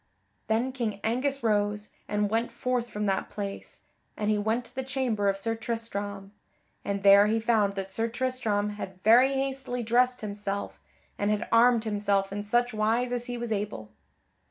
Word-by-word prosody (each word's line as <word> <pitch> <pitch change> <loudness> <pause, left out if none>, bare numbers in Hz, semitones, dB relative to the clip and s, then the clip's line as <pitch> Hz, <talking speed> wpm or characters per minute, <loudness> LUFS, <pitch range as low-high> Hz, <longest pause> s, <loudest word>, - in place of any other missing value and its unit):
Then 230 +4 +1
King 230 -6 -3
Angus 255 +4 0
rose, 210 -1 0 0.2
and 210 -1 0
went 230 +2 +1
forth 250 -1 -2
from 210 -1 -3
that 195 -1 0
place, 200 -1 -6 0.4
and 210 0 0
he 210 - +2
went 220 +4 0
to 240 - -14
the 265 - -3
chamber 255 -6 0
of 195 - 0
Sir 225 +3 -1
Tristram. 205 -4 -5 0.5
And 200 -1 -3
there 200 +1 +8
he 225 +1 +1
found 220 -3 +2
that 195 -1 -4
Sir 225 +2 0
Tristram 230 -4 -1
had 195 -3 -7
very 245 +5 +6
hastily 265 -2 -2
dressed 250 +2 +2
himself 200 -1 -4 0.4
and 205 - +1
had 210 +1 0
armed 235 0 +5
himself 205 -2 0
in 205 - -3
such 240 +3 +1
wise 225 +3 +1
as 245 0 -2
he 245 0 -4
was 235 -1 -4
able. 200 - -3
220 Hz, 175 wpm, -28 LUFS, 205-240 Hz, 0.5 s, there